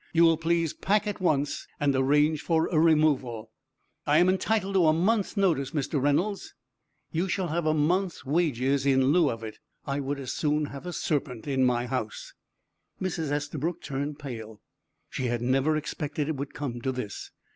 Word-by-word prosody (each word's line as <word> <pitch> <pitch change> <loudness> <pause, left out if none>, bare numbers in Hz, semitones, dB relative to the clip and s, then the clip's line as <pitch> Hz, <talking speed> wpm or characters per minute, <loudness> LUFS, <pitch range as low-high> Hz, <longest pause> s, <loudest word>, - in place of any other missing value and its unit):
You 170 0 +5
will 165 -1 +5
please 165 -1 0
pack 210 +1 +1
at 205 -2 -4
once, 145 -5 0
and 145 -2 +2
arrange 145 +3 +3
for 160 +1 +1
a 160 - +3
removal." 140 -9 +2 0.6
"I 145 +1 +4
am 175 +2 +5
entitled 195 +1 0
to 180 -4 +4
a 155 - +5
month's 205 +6 +1
notice, 165 -8 +1
Mr. 145 -1 -1
Reynolds." 170 +9 0 0.6
"You 170 +4 0
shall 185 -1 -1
have 165 +1 -1
a 155 - +3
month's 175 +4 0
wages 140 -3 +1
in 135 0 +4
lieu 165 -2 +4
of 115 0 -5
it. 110 -1 -8 0.3
I 140 0 -2
would 140 +1 -3
as 130 -3 -4
soon 150 0 0
have 140 +4 -8
a - - -3
serpent 135 -9 -2
in 135 -2 +1
my 120 -1 +2
house." 120 -4 -4 0.7
Mrs. 165 -5 -2
Estabrook 150 +3 -2
turned 140 +1 -3
pale. 110 -7 -8 0.5
She 130 - -4
had 120 -1 -1
never 135 +5 +2
expected 150 -1 -3
it 160 - -1
would 140 +1 -6
come 120 -5 -4
to 130 - -1
this. 125 -6 -6
150 Hz, 180 wpm, -27 LUFS, 135-165 Hz, 0.7 s, You